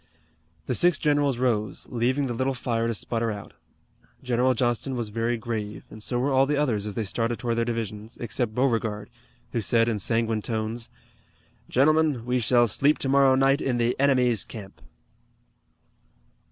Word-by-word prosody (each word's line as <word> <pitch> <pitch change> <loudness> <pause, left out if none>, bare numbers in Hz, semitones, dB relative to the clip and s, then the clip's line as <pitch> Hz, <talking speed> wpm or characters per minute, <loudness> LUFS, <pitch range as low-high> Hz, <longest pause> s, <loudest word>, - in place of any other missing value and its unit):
The 125 - -1
six 175 +4 +3
generals 145 -3 +1
rose, 110 -5 -1
leaving 125 +4 +1
the 125 - -2
little 130 +3 -1
fire 115 -2 -1
to 115 - 0
sputter 115 +2 -2
out. 100 -1 -8 0.7
General 125 +1 +2
Johnston 120 +2 0
was 120 -3 -3
very 115 +2 -1
grave, 110 -2 -5
and 110 - -10
so 120 +3 -2
were 135 +3 0
all 135 0 +4
the 150 0 0
others 115 -8 0
as 105 - -6
they 115 - -1
started 115 +3 -2
toward 115 -2 -2
their 115 - +1
divisions, 110 -1 -5
except 115 0 -3
Beauregard, 115 -5 0 0.4
who 115 - -1
said 115 +2 +2
in 110 -3 -1
sanguine 115 +1 0
tones: 110 +1 -3 0.8
"Gentlemen, 150 -2 +2
we 125 +1 +1
shall 120 +1 +4
sleep 140 +7 +2
tomorrow 135 -1 +4
night 135 +2 +3
in 125 -2 0
the 120 +1 +1
enemy's 125 -6 +3
camp." 100 -4 -11
120 Hz, 165 wpm, -25 LUFS, 115-130 Hz, 0.8 s, all